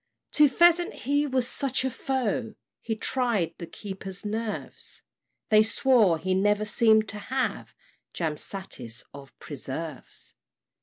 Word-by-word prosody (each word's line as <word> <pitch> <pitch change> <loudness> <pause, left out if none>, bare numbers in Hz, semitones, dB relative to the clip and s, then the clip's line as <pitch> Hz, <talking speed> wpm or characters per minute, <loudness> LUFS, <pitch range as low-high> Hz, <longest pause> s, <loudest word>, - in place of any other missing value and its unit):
To 300 -1 +5
pheasant 345 +5 +4
he 285 +2 +2
was 255 -2 +1
such 265 -1 0
a 260 - 0
foe, 240 -4 -2 0.3
He 225 - -2
tried 230 -6 0
the 170 - -6
keepers' 190 +1 -7
nerves; 220 +1 -5 0.5
They 215 -2 +7
swore 220 -5 +3
he 185 +3 -1
never 205 +2 +2
seem'd 220 0 +4
to 210 - -5
have 260 +6 -3 0.4
Jam 160 -3 -2
satis 130 - -7
of 140 -1 -13
preserves. 150 +3 -7
215 Hz, 125 wpm, -27 LUFS, 185-255 Hz, 0.5 s, They